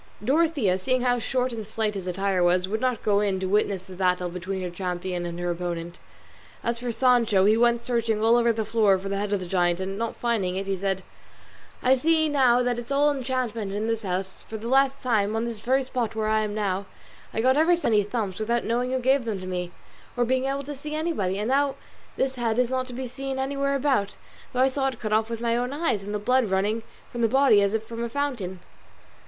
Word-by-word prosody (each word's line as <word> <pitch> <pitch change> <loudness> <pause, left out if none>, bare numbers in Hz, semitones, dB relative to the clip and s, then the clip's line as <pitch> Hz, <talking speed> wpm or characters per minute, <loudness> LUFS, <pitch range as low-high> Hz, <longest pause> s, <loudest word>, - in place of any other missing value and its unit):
Dorothea, 275 - +2
seeing 255 +6 0
how 245 -1 +2
short 250 +1 -1
and 220 -3 -6
slight 220 -1 -1
his 190 -2 -6
attire 190 +1 0
was, 180 +1 +3
would 220 +3 -2
not 255 -3 0
go 205 -1 +3
in 200 -2 0
to 190 - -2
witness 200 -1 +1
the 190 - -12
battle 180 -1 +1
between 185 +2 -4
her 180 - -4
champion 180 -1 -3
and 170 0 -6
her 175 0 -1
opponent. 175 0 -4 0.6
As 235 0 -1
for 245 0 -3
Sancho, 230 -5 +3
he 215 +2 +5
went 235 0 +2
searching 230 -3 0
all 225 +2 +4
over 235 -1 +4
the 220 -1 -2
floor 210 -4 +3
for 195 +1 -6
the 200 - -1
head 205 0 -2
of 205 - +1
the 185 - -5
giant, 175 -1 +1
and 195 +2 -4
not 230 0 -2
finding 215 -7 -1
it 195 +1 -2
he 195 0 -1
said, 190 0 -2 0.8
"I 255 +1 +5
see 315 +3 +2
now 250 -4 +4
that 245 -1 0
it's 240 +2 -8
all 290 +1 +4
enchantment 250 -6 -2
in 210 +2 -2
this 225 -1 -1
house; 190 -1 -3
for 220 - -7
the 220 +2 -6
last 270 +2 +3
time, 220 -4 +1
on 225 +1 0
this 230 -2 -5
very 260 +4 +1
spot 245 -4 -3
where 215 -1 0
I 220 0 +3
am 210 -1 -2
now, 200 -2 -1 0.4
I - - -3
got 260 +3 +4
ever 325 +4 +4
so 340 -8 -1
many 210 -1 +5
thumps 205 -2 -3
without 235 +2 0
knowing 245 +2 -1
who 260 - +1
gave 260 0 +2
them 215 -4 -2
to 185 - -7
me, 180 -1 -3 0.5
or 245 - +3
being 260 +2 +1
able 275 +1 -1
to 290 +2 -6
see 300 +2 -6
anybody; 305 - -1
and 210 +3 -2
now 275 0 +2 0.4
this 265 0 +1
head 235 -3 -1
is 250 0 +2
not 255 0 -1
to 250 - -8
be 255 +1 -4
seen 270 +2 -5
anywhere 275 +1 0
about, 265 -7 +1 0.4
though 255 - 0
I 260 - +6
saw 270 0 0
it 255 -4 -4
cut 215 -1 -2
off 220 +1 +2
with 230 0 -4
my 235 -1 +1
own 245 +2 -1
eyes 290 -8 0
and 200 +1 -6
the 210 - -1
blood 250 +4 +2
running 205 +4 0 0.3
from 240 - -4
the 230 - +4
body 265 -3 +5
as 200 +2 +1
if 220 - -1
from 230 +1 -6
a 235 - -3
fountain." 230 -10 -3
225 Hz, 245 wpm, -25 LUFS, 195-255 Hz, 0.8 s, I